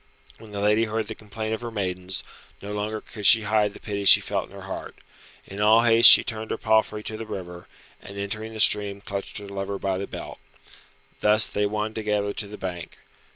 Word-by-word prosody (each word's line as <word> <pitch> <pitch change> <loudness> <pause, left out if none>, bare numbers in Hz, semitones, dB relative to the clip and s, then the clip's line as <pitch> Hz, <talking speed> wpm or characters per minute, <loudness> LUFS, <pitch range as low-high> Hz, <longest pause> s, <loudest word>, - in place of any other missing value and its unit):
When 110 - -13
the 100 -1 -5
lady 105 +2 +3
heard 110 0 -3
the 110 - -5
complaint 110 +1 -6
of 110 - -4
her 120 - -5
maidens, 95 -3 -4 0.4
no 105 +1 -7
longer 105 +1 -3
could 105 - -10
she 115 -1 +7
hide 105 -1 +1
the - - -11
pity 100 -2 -4
she - - +9
felt - - -3
in - - -15
her - - -10
heart. - - -7 0.5
In 100 +2 -7
all 110 +2 +5
haste 115 0 +8
she - - +8
turned 110 -1 -5
her - - -2
palfrey 110 -1 +1
to 110 - -5
the 115 - -6
river, 90 -4 -8 0.3
and 100 - -11
entering 110 +3 -4
the 110 - -8
stream 100 -2 +2
clutched 100 0 -6
her 105 -1 -7
lover 100 0 -4
by 95 -1 -2
the 100 - -5
belt. - - -9 0.8
Thus 105 +1 +4
they 105 0 -1
won 105 +1 -3
together 105 -2 -2
to 105 - -3
the 105 +1 -10
bank. 90 -3 -7
105 Hz, 215 wpm, -24 LUFS, 100-110 Hz, 0.8 s, she